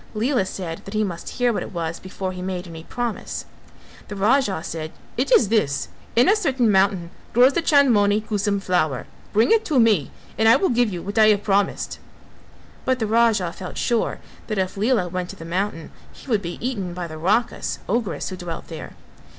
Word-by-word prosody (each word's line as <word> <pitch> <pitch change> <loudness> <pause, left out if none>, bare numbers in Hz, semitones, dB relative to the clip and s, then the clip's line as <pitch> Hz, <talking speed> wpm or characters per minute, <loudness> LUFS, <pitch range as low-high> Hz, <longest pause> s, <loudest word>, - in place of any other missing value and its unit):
Lela 225 -2 +1
said 170 -4 -5
that 195 - -7
he 215 - +2
must 175 -5 -5
hear 245 -2 +1
what - - -2
it - - -7
was 165 -1 -3
before 185 0 -5
he 180 -1 -7
made 185 0 -4
any 165 -1 -9
promise. 240 +4 -4 0.6
The 205 - -6
Raja 205 -3 +2
said 160 -1 -5 0.2
"It 255 +2 -1
is 220 -5 +5
this: 150 -11 +1 0.3
in 240 +3 +5
a 405 - +6
certain 265 - +2
mountain 190 -3 +2 0.2
grows 250 +4 +6
the 340 - +1
Chandmoni 230 -10 +4
Kusum 205 -2 -1
flower; 155 -9 0 0.3
bring 220 - +3
it 450 -1 +5
to 295 -6 +2
me 215 - +3 0.3
and 220 0 +5
I 230 - +8
will 385 - +2
give 240 -2 +2
you 175 -2 -5
what 200 +3 -2
I 215 - +7
have 205 -1 +3
promised:" 200 -1 0 0.8
but 260 0 +1
the 225 - -1
Raja 220 -5 +2
felt 185 - -8
sure 235 -2 0 0.3
that 215 - -2
if 185 -1 -1
Lela 210 -2 +1
went 180 0 -4
to - - -7
the 165 - -10
mountain 170 -2 -3 0.2
he - - -15
would 220 -6 +1
be 170 -2 -5
eaten 195 -9 -4
by 180 -1 -4
the 155 -1 -8
Rakhas 210 +8 0
(ogress) 200 -8 -1
who 185 - -6
dwelt 175 -2 -7
there. 160 - -8
205 Hz, 200 wpm, -23 LUFS, 180-235 Hz, 0.8 s, I